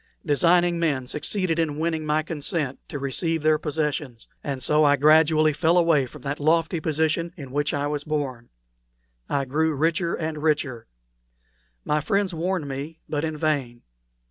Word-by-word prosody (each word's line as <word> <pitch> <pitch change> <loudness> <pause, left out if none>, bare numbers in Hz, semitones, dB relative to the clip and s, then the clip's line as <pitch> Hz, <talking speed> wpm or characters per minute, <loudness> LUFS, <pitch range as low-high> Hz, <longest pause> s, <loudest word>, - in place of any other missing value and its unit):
Designing 175 +3 +3
men 145 -6 0
succeeded 165 +5 -1
in 155 -3 0
winning 160 -1 -1
my 155 +1 +1
consent 150 -3 -3
to - - -4
receive 150 +4 -1
their 155 0 +3
possessions; 150 -5 -3 0.2
and 135 -2 -4
so 150 +1 +3
I 145 -1 +5
gradually 155 +1 +4
fell 165 +3 +2
away 165 -6 +3
from - - -13
that 140 0 -3
lofty 165 +3 +2
position 160 +2 0
in 135 -5 -9
which 145 +3 0
I 145 -3 -1
was 145 0 -2
born. 140 -6 -3 0.8
I 140 -1 0
grew 155 +4 0
richer 165 +3 +1
and 155 -2 -4
richer. 150 -6 -1 1.0
My 150 0 +1
friends 200 +1 0
warned 170 -1 -2
me, 140 +4 -6
but 150 -1 -2
in 160 -1 -2
vain. 140 -6 -1
155 Hz, 160 wpm, -24 LUFS, 145-165 Hz, 1.0 s, I